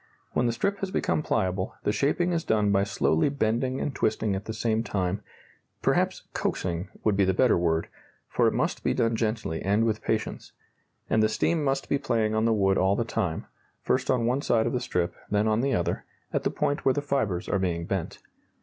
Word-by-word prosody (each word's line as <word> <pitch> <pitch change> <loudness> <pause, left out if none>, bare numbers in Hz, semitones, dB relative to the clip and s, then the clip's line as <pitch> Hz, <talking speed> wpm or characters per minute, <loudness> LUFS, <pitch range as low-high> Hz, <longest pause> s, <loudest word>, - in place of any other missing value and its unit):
When 120 - +1
the - - +2
strip 200 - -1
has 195 - -2
become 155 - 0
pliable, 95 -8 -1
the - - +2
shaping 175 +9 +1
is 165 -1 0
done 105 -2 +2
by 100 0 +3
slowly 100 - +2
bending 130 0 0
and 145 - -2
twisting 110 -4 0
at 95 - -5
the - - -4
same 110 0 0
time 95 -2 -1 0.6
perhaps - - +1
"coaxing" 90 +1 -2
would 105 -2 +2
be 100 - +3
the 95 -1 +2
better 125 +2 +4
word, 85 -1 +1 0.4
for - - +2
it - - +2
must - - -1
be - - +1
done 115 -2 +2
gently 110 -7 -2
and 105 +4 +2
with 110 -1 0
patience 110 -1 -3 0.5
and 110 - +2
the 110 - +3
steam 155 +8 +1
must 135 -1 0
be 140 - +1
playing 115 -5 0
on 110 +1 +2
the 115 - +3
wood 95 -3 +3
all 95 +1 +3
the 115 - 0
time, 95 -8 -2 0.4
first 130 0 0
on 125 -3 +2
one 125 +4 +1
side 115 -5 +2
of 120 - -1
the 125 - +1
strip, 90 -8 -1 0.2
then 105 +1 +2
on 110 +1 +2
the 135 -1 +1
other, 85 - -1 0.3
at - - +1
the - - 0
point 145 - -1
where 130 -1 +3
the 145 - 0
fibres 110 -11 -1
are 100 - +1
being 85 -3 -1
bent. 95 -2 -3
110 Hz, 215 wpm, -27 LUFS, 95-125 Hz, 0.6 s, better